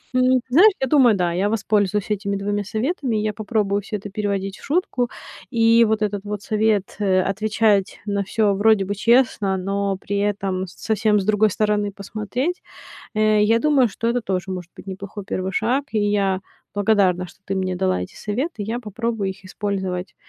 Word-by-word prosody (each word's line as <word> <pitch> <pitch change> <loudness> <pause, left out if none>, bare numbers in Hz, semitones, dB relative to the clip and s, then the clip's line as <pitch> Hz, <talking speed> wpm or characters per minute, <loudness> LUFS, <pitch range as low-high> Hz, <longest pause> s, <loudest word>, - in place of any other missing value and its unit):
М, 255 0 +4
знаешь, 355 +12 +7
я 265 - +1
думаю, 250 -5 +5
да, 175 -2 0
я 190 +4 +1
воспользуюсь 210 -2 0
этими 200 -1 -1
2 205 +1 -2
советами. 245 - -1
Я 215 0 -1
попробую 205 -1 -1
всё 210 +1 -4
это 205 +1 -8
переводить 200 -1 -2
в - - -17
шутку. 275 -6 0 0.4
И 230 0 +5
вот 220 0 0
этот 205 -1 -2
вот 205 -1 -4
совет, 215 -2 0
э, 190 -2 +3
отвечать 210 0 +1
на 200 -1 -1
всё, 205 +1 +1
вроде 205 0 +3
бы, 200 - -2
честно, 225 -3 +2
но 195 +1 -1
при 200 +1 -4
этом 195 -2 -1
совсем 210 +3 0
с 190 - -3
другой 215 +1 +3
стороны 210 0 0
посмотреть. 215 - -3 0.5
Э, 215 0 +3
я 225 +2 +3
думаю, 280 -2 +3
что 225 +3 -3
это 245 +1 0
тоже 190 -3 -3
может 180 -2 -6
быть - - -11
неплохой 195 +2 -7
первый 185 -1 -3
шаг, 250 +7 +1
и 220 - +1
я 200 -2 +1 0.4
благодарна, 195 -3 +2
что - - -18
ты 195 - -2
мне 185 -1 -1
дала 185 - 0
эти 90 - -8
советы. 240 +6 -3
Я 225 +4 -3
попробую 225 -2 -3
их 195 +1 -14
использовать 190 -2 -3
205 Hz, 180 wpm, -22 LUFS, 195-220 Hz, 0.5 s, знаешь